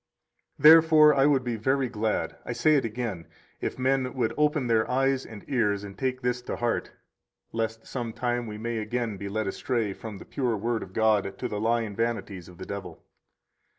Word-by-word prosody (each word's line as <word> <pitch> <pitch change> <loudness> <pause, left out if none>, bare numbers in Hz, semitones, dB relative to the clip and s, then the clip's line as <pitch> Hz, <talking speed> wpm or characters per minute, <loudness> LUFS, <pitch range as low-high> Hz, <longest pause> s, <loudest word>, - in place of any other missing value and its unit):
121 160 +3 +9
Therefore 155 -2 +6
I 140 0 +4
would 135 -3 +3
be 120 -2 -2
very 130 +4 +1
glad 110 -2 -2
(I 120 - -4
say 155 +6 +3
it 140 - +3
again) 110 -7 -4 0.3
if - - -3
men 130 0 0
would 120 -4 0
open 150 -2 +2
their 115 -2 +2
eyes 135 +1 +1
and 105 -2 -11
ears, 105 -7 +1
and 100 -1 -8
take 130 +3 -2
this 125 0 0
to - - -4
heart, 120 -1 -1 0.6
lest 115 0 -3
some 120 -3 -4
time 120 0 -2
we 105 -1 -6
may 115 +1 -3
again 110 -1 -2
be 100 +1 -5
led 110 +2 -2
astray 110 +1 -1
from 110 0 -8
the - - -11
pure 125 -5 -1
Word 115 +2 -1
of 95 - -9
God 105 -3 +2
to - - -3
the 105 0 -4
lying 115 -2 0
vanities 110 -6 -3
of 90 - -14
the 95 - -7
devil. 95 -4 -7
115 Hz, 200 wpm, -27 LUFS, 105-130 Hz, 0.6 s, 121